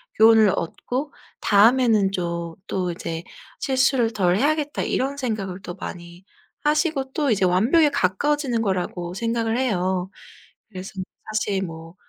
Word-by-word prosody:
교훈을 220 Hz, -2 st, +6 dB
얻고 255 Hz, -, -4 dB, 0.3 s
'다음에는 220 Hz, -1 st, +4 dB
좀 170 Hz, -3 st, -3 dB
또 180 Hz, -2 st, -1 dB
이제 165 Hz, -1 st, -5 dB, 0.4 s
실수를 260 Hz, -3 st, +2 dB
덜 185 Hz, -4 st, +2 dB
해야겠다.' 295 Hz, +3 st, 0 dB
이런 275 Hz, +2 st, -1 dB
생각을 200 Hz, -8 st, -3 dB
또 175 Hz, -1 st, -7 dB
많이 175 Hz, +1 st, -9 dB, 0.4 s
하시고 300 Hz, -3 st, +1 dB
또 295 Hz, -3 st, 0 dB
이제 195 Hz, -4 st, +2 dB
완벽에 235 Hz, -, +4 dB
가까워지는 260 Hz, +4 st, 0 dB
거라고 180 Hz, -3 st, -2 dB
생각을 230 Hz, +1 st, -1 dB
해요. 190 Hz, -6 st, 0 dB, 0.6 s
그래서 190 Hz, -2 st, -8 dB, 0.4 s
사실 205 Hz, -2 st, -1 dB
뭐 165 Hz, -1 st, -8 dB
215 Hz, 285 characters per minute, -23 LUFS, 180-260 Hz, 0.6 s, 교훈을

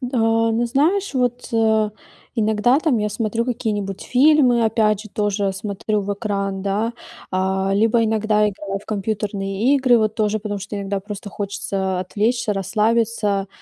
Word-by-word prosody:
Да, 225 Hz, -3 st, +1 dB
но 235 Hz, +2 st, +1 dB
знаешь, 320 Hz, +9 st, +1 dB
вот, 245 Hz, -1 st, -1 dB
э, 220 Hz, -1 st, +2 dB, 0.5 s
иногда, 220 Hz, +4 st, +3 dB
там, 300 Hz, -8 st, +1 dB
я 210 Hz, 0 st, 0 dB
смотрю 225 Hz, +2 st, -1 dB
какие-нибудь 210 Hz, -5 st, -3 dB
фильмы, 255 Hz, -3 st, +4 dB
опять 215 Hz, -2 st, +2 dB
же, 215 Hz, -, -11 dB
тоже 205 Hz, -1 st, -1 dB
смотрю 205 Hz, +1 st, -2 dB
в 200 Hz, +1 st, -2 dB
экран, 200 Hz, -2 st, -3 dB
да. 210 Hz, +4 st, -1 dB, 0.4 s
А, 190 Hz, +1 st, 0 dB
либо 225 Hz, +2 st, +3 dB
иногда 215 Hz, -1 st, +2 dB
играю 195 Hz, 0 st, -5 dB
в -, -, -19 dB
компьютерные 205 Hz, +3 st, -1 dB
игры, 255 Hz, -3 st, +4 dB
вот 215 Hz, 0 st, 0 dB
тоже, 215 Hz, 0 st, 0 dB
потому 205 Hz, -1 st, -4 dB
что 200 Hz, +2 st, -6 dB
иногда 200 Hz, 0 st, -3 dB
просто 205 Hz, 0 st, -8 dB
хочется 195 Hz, -2 st, -3 dB
отвлечься, 215 Hz, +4 st, 0 dB
расслабиться. 210 Hz, 0 st, 0 dB
215 Hz, 150 wpm, -21 LUFS, 200-230 Hz, 0.5 s, фильмы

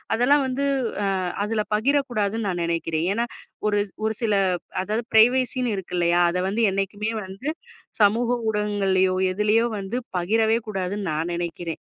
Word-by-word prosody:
அதெல்லாம் 275 Hz, +4 st, +4 dB
வந்து 265 Hz, +2 st, -1 dB, 0.4 s
அ -, -, +1 dB, 0.4 s
அதுல 215 Hz, -1 st, -1 dB
பகிரக்கூடாதுன்னு 225 Hz, -4 st, 0 dB
நான் 175 Hz, -2 st, -2 dB
நினைக்கிறேன். 165 Hz, 0 st, -1 dB
ஏன்னா 235 Hz, +2 st, -1 dB, 0.4 s
ஒரு 205 Hz, -1 st, +2 dB, 0.3 s
ஒரு 220 Hz, -, +1 dB
சில 215 Hz, -2 st, +2 dB, 0.5 s
அதாவது 215 Hz, +4 st, -2 dB
ஃப்ரைவசின்னு 245 Hz, +1 st, +3 dB
இருக்கு 180 Hz, -1 st, -5 dB
இல்லயா? 175 Hz, 0 st, +3 dB
அத 180 Hz, -, -2 dB
வந்து 225 Hz, +4 st, -1 dB
என்னைக்குமே 205 Hz, +3 st, -2 dB
வந்து 195 Hz, +10 st, -5 dB, 0.5 s
சமூக 230 Hz, +4 st, +3 dB, 0.2 s
ஊடகங்கள்லயோ! 195 Hz, -3 st, +1 dB, 0.2 s
எதிலயோ! 210 Hz, +4 st, +2 dB
வந்து 195 Hz, +5 st, -4 dB, 0.2 s
பகிரவே 220 Hz, +5 st, +2 dB
கூடாதுன்னு 195 Hz, -1 st, -3 dB
நான் 165 Hz, +3 st, -2 dB
நினைக்கிறேன். 170 Hz, 0 st, -4 dB
210 Hz, 135 wpm, -24 LUFS, 185-230 Hz, 0.5 s, அதெல்லாம்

